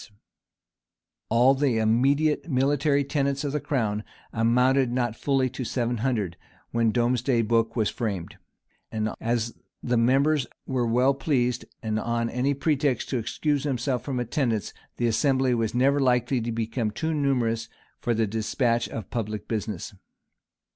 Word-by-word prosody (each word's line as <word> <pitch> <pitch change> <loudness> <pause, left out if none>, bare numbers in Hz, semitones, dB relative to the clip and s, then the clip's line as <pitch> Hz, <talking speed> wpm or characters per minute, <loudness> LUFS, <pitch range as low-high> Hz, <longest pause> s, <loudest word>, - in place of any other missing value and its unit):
] - - -63
All 125 +3 +6
the 135 -4 +1
immediate 140 +9 +2
military 140 +1 +2
tenants 140 0 -1
of 145 - -1
the 150 - -1
crown 110 -8 -1 0.3
amounted 125 +3 +3
not 120 -2 0
fully 135 0 +1
to 130 0 -5
seven 120 0 -1
hundred, 110 -7 -1 0.3
when 115 -1 +2
Domesday 120 +1 +1
book 115 0 +1
was 110 -3 +2
framed; 100 -7 -4 0.5
and 110 0 -2
as 115 0 -1 0.3
the 120 -1 +1
membeirs 135 +3 +3 0.2
were 125 -3 0
well 125 +4 +3
pleased, 130 -3 0 0.2
on 115 +2 -1
any 135 +3 0
pretext, 140 -3 0
to 130 - 0
excuse 145 +5 -1
themselves 130 -2 -1
from 130 -3 -2
attendance, 120 -3 -1 0.2
the 120 - 0
assembly 130 +2 +2
was 115 -1 -1
never 140 +3 +3
likely 125 -1 +2
to 115 +1 -3
become 115 0 -1
too 160 +9 -2
numerous 120 -6 0 0.3
for 120 - 0
the 110 0 +2
despatch 115 +3 0
of 110 -5 -7
public 105 -3 -3
business. 110 -2 -4
120 Hz, 145 wpm, -26 LUFS, 115-135 Hz, 0.5 s, All